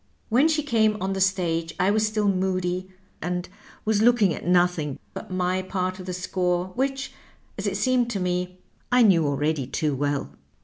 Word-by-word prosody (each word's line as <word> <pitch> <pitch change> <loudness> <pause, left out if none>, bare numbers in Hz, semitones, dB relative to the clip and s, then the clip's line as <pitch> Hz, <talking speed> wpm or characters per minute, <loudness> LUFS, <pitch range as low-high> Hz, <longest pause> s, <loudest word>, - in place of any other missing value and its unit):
" - - -40
When 255 +7 +4
she 310 -2 +1
came 220 -6 +2
on 195 0 -1
the 190 - -2
stage 170 -4 0
I 185 +2 +3
was 215 +1 +2
still 215 -1 0
moody, 185 -1 0 0.3
and 180 0 -2 0.4
was 215 -1 +2
looking 220 -6 +4
at - - -7
nothing 175 -5 +2 0.2
but - - -8
my 185 0 0
part 185 0 -3
of 185 - -8
the - - -2
score, 180 0 -1
which, 270 +3 -2 0.4
as - - -3
it - - -1
seemed 255 -2 +2
to 210 -4 -2
me, 180 0 -2 0.3
I 250 0 +6
knew 170 -8 +5
already 145 -1 0
too 150 +1 -1
well. 145 +1 -1
185 Hz, 185 wpm, -25 LUFS, 175-215 Hz, 0.4 s, I